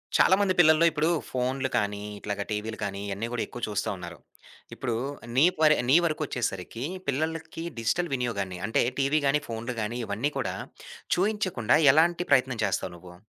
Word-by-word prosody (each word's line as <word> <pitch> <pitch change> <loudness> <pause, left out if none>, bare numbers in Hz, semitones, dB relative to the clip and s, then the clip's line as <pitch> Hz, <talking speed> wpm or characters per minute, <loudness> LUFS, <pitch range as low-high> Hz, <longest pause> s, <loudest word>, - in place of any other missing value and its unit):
చాలా 190 - +6
మంది 195 -2 +2
పిల్లల్లో, 155 -1 +6
ఇప్పుడు 155 +1 +1 0.2
ఫోనులు 130 +1 -1
కానీ, 105 -1 -1 0.2
ఇట్లాగా 100 0 -3
టీవీలు 110 +1 -3
కానీ, 100 -1 -3
ఇయన్నీ 100 +3 -3
గూడా 120 - -1
ఎక్కువ 120 - -9
చూస్తా 105 -2 -2
ఉన్నారు. 85 -3 -9 0.5
ఇప్పుడు 120 -3 -3 0.4
నీ 135 +5 +6
పరి 155 -1 +6
నీ 135 - +6
వరకొచ్చేసరికి, 125 - -3 0.2
పిల్లలకి 160 +3 -2 0.2
డిజిటల్ 150 +9 0
వినియోగాన్ని, 100 -8 -3
అంటే 110 - +2 0.2
టీవీగానీ, 140 +1 +2
ఫోనులు 115 +2 -4
గానీ, 110 +3 -3
ఇవన్నీ 110 +8 -1
గూడా, - - -2 0.6
చూయించకుండా 185 - +1 0.2
ఎలాంటి 170 +3 +3
ప్రయత్నం 130 -3 +3
చేస్తావు 95 -2 -2
నువ్వు? 90 0 -13
125 Hz, 150 wpm, -27 LUFS, 105-155 Hz, 0.6 s, చాలా